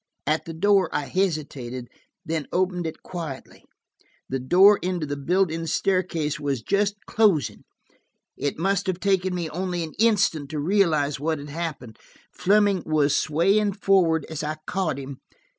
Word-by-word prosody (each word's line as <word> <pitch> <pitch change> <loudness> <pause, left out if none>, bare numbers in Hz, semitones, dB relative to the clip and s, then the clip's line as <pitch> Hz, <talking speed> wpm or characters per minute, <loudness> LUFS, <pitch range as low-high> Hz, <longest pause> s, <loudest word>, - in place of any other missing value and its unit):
At 155 +2 0
the 165 - -6
door 195 +1 +3
I 145 - -1
hesitated, 140 -9 -2 0.4
then 160 -3 -2
opened 180 -1 0
it 160 - -8
quietly. 160 -7 -8 0.6
The 135 - -2
door 190 +10 +6
into 180 -3 -2
the 145 -1 -3
built 175 +5 +1
in 165 0 -4
staircase 165 -4 0
was 140 -5 -2
just 200 - +1
closing. 155 - +1 0.7
It 145 - -3
must 195 +3 0
have 185 -1 -1
taken 190 -2 +1
me 175 -2 -2
only 180 0 -2
an 160 - -7
instant 200 -10 +2
to 155 -1 -3
realize 155 -5 +1
what 160 +2 -1
had 145 +1 -9
happened. 145 -7 -6 0.3
Fleming 200 -1 +2
was 150 -2 +2
swaying 195 +7 +2
forward 185 -6 +2
as 160 -2 -5
I 155 +1 -2
caught 180 -7 -1
him. 135 -1 -8
165 Hz, 155 wpm, -24 LUFS, 150-190 Hz, 0.7 s, door